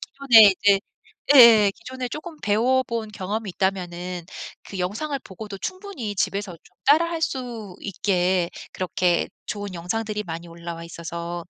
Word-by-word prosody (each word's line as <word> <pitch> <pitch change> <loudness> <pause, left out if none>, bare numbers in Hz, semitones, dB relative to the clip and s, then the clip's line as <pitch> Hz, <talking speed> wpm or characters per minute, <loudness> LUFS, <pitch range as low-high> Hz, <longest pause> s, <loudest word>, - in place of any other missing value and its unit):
기존에 230 -7 +6
이제 200 -1 +5 0.5
예예예 225 -6 +8
기존에 255 +1 -6
조금 310 +4 -7
배워본 230 +1 +1
경험이 205 +2 -4
있다면은 180 -2 -3 0.4
그 195 - -7
영상을 230 +11 -2
보고도 200 +1 -8
충분히 370 - -5
집에서 195 0 -1
좀 165 - -18
따라 305 +4 +6
할 330 -1 -3
수 235 - -4
있게 185 -2 0 0.2
그렇게 180 -1 0 0.2
좋은 205 -2 -5
영상들이 210 +5 -3
많이 170 -1 -7
올라와 170 0 -8
있어서 170 +1 -6
205 Hz, 315 characters per minute, -23 LUFS, 180-235 Hz, 0.5 s, 예예예